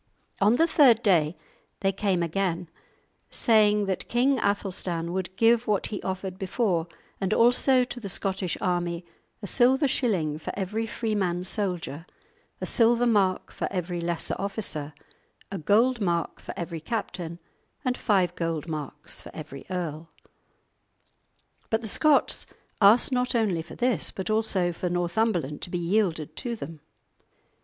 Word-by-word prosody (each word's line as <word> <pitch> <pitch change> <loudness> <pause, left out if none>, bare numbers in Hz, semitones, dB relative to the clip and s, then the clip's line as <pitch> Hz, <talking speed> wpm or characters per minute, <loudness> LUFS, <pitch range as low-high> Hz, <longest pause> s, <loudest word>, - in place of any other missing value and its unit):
On 210 +4 +5
the 325 - +4
third 265 -8 +5
day 165 -5 +3 0.4
they 195 - +2
came 195 -3 0
again, 175 0 -1 0.6
saying 210 -3 +4
that 190 -1 -3
King 255 +2 +3
Athelstan 180 -4 -1
would 185 0 -3
give 230 +1 +4
what 210 -2 +1
he 205 - -3
offered 190 0 -4
before 190 -4 0 0.3
and 195 +1 0
also 250 +2 +4
to 245 0 -6
the 205 -4 -5
Scottish 190 -2 -1
army 175 -1 -1 0.4
a - - -2
silver 260 - +3
shilling 180 - 0
for - - -5
every 210 +4 -2
freeman 200 -6 -1
soldier, 180 - -2 0.5
a - - -3
silver 240 0 +4
mark 200 -5 +2
for - - -3
every 175 -2 -3
lesser 170 0 -2
officer, 185 -7 -4 0.6
a 195 - -3
gold 230 +9 +3
mark 170 -3 -1
for - - -8
every 170 -1 -4
captain, 175 -4 -4 0.5
and 250 -1 +1
five 190 -8 +2
gold 165 -2 -3
marks 150 -2 -6
for - - -10
every 140 -3 -9
earl. 165 -3 -4 1.6
But 220 0 +1
the 225 - -5
Scots 300 +7 +3 0.3
asked 215 +7 +6
not 250 0 0
only 205 -8 +1
for 165 - -11
this, 245 -9 +1
but 190 +3 -4
also 200 -5 +1
for 180 +2 -3
Northumberland 175 -4 0
to - - -6
be 175 - -2
yielded 170 -4 0
to 240 -2 -3
them. 160 -6 -8
190 Hz, 145 wpm, -26 LUFS, 170-225 Hz, 1.6 s, asked